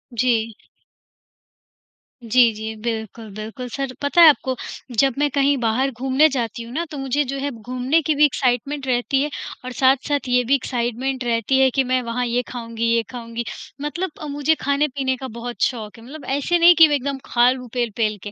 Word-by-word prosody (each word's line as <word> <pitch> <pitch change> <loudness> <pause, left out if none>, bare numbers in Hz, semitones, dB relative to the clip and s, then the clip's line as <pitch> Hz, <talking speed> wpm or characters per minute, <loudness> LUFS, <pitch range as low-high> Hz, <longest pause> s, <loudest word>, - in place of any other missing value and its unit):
जी। 230 -2 0 1.7
जी, 235 +1 +4
जी 220 +1 -6
बिल्कुल, 225 -1 -5
बिल्कुल 225 +4 -7
सर। 270 +1 -4
पता 290 +5 +3
है 330 - +11
आपको 260 -3 +1 0.4
जब 270 -2 +4
मैं 295 - +2
कहीं 280 +1 +2
बाहर 250 +4 +1
घूमने 265 +5 +3
जाती 235 -4 -3
हूँ 230 - -11
ना 335 +4 -2
तो 295 - -6
मुझे 270 +2 0
जो 275 - -3
है 285 +1 -2
घूमने 255 +6 -1
की 310 0 0
भी 295 +1 +6
एक्साइटमेंट 265 +1 -1
रहती 255 +2 +1
है 295 - -2 0.4
और 255 - -5
साथ-साथ 270 +1 +2
ये 250 0 +3
भी 270 +4 +3
एक्साइटमेंट 255 +1 -2
रहती 235 +2 +1
है 265 0 +5
कि 270 +1 +1
मैं 255 0 0
वहाँ 245 +1 -2
ये 240 +1 0
ख़ाऊँगी, 230 -2 -5
ये 230 - +1
ख़ाऊँगी 235 -1 -5 0.4
मतलब 330 +4 -3
अ, 305 - -5
मुझे 290 +2 +1
ख़ाने-पीने 280 -2 0
का 260 +1 -6
बहुत 235 +1 -7
शौक 220 -4 -2
है। 230 - -14
मतलब 275 +3 -10
ऐसे 345 +5 +1
नहीं 345 +1 +7
कि 325 0 +8
मैं 295 - +1
एकदम 280 0 -2
ख़ा 240 0 +4
लूँ 255 -1 -6
पेल-पेल 225 -3 -1
के 205 - -6
255 Hz, 195 wpm, -21 LUFS, 235-280 Hz, 1.7 s, है